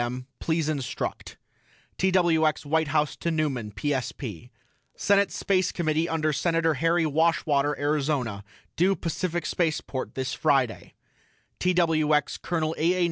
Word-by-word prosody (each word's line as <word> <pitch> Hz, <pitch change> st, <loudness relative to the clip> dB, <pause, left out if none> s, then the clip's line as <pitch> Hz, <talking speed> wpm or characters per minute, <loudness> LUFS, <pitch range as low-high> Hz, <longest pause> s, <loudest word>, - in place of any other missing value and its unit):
M. 125 Hz, +1 st, -3 dB
PLEASE 160 Hz, -2 st, 0 dB
INSTRUCT 135 Hz, -4 st, -4 dB, 0.6 s
TWX 170 Hz, -5 st, +2 dB
WHITE 160 Hz, +1 st, +1 dB
HOUSE 150 Hz, 0 st, +1 dB
TO 170 Hz, -, -2 dB
NEUMAN 145 Hz, -9 st, -1 dB
PSP: 125 Hz, -, -3 dB, 0.5 s
SENATE 200 Hz, 0 st, +2 dB
SPACE 185 Hz, -2 st, +1 dB
COMMITTEE 160 Hz, -1 st, 0 dB
UNDER 155 Hz, -1 st, 0 dB
SENATOR 165 Hz, +1 st, +1 dB
HARRY 165 Hz, +4 st, +2 dB
WASHWATER 150 Hz, -2 st, +2 dB
ARIZONA 140 Hz, -8 st, -1 dB, 0.3 s
DUE 190 Hz, +3 st, +3 dB
PACIFIC 175 Hz, 0 st, -3 dB
SPACEPORT 155 Hz, -6 st, -2 dB
THIS 130 Hz, 0 st, -2 dB
FRIDAY 135 Hz, -6 st, 0 dB, 0.6 s
TWX 160 Hz, -5 st, +2 dB
COL. 160 Hz, -2 st, -1 dB
A. 165 Hz, +3 st, +3 dB
A. 185 Hz, -, -2 dB
155 Hz, 120 wpm, -26 LUFS, 140-170 Hz, 0.6 s, DUE